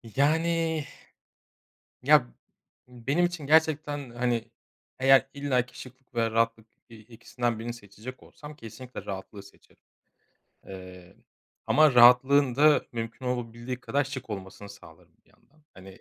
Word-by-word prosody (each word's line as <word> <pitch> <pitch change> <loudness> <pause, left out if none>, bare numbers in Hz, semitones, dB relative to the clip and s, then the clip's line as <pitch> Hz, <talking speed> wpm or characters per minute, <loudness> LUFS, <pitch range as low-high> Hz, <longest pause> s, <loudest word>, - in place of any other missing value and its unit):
Yani. 160 +2 +1 1.2
Ya, - - +5 0.6
benim 130 +8 -1
için 175 -5 -6
gerçekten, 150 -3 +1
hani, 120 -1 -2 0.5
eğer 135 0 +5
illaki 130 -3 -2
şıklık 130 0 -14
ve 115 -1 0
rahatlık, 115 0 0 0.2
eee, 115 -1 -14
ikisinden 115 +1 -4
birini 120 +1 -5
seçecek 110 +3 -11
olsam 150 0 -13
kesinlikle 125 +1 -10
rahatlığı 100 +1 -7
seçerim. 100 - -21 0.8
Eee, 90 -1 -12 0.5
ama 155 -3 +4
rahatlığın 125 +2 +6
da 150 +1 +4
mümkün 115 +2 -6
olabildiği 120 0 -4
kadar 140 +3 0
şık 130 -4 -8
olmasını 100 0 -8
sağlarım 100 0 -16
bir - - -30
yandan. 155 +1 -30
Hani, 95 0 -13
125 Hz, 120 wpm, -27 LUFS, 115-145 Hz, 1.2 s, rahatlığın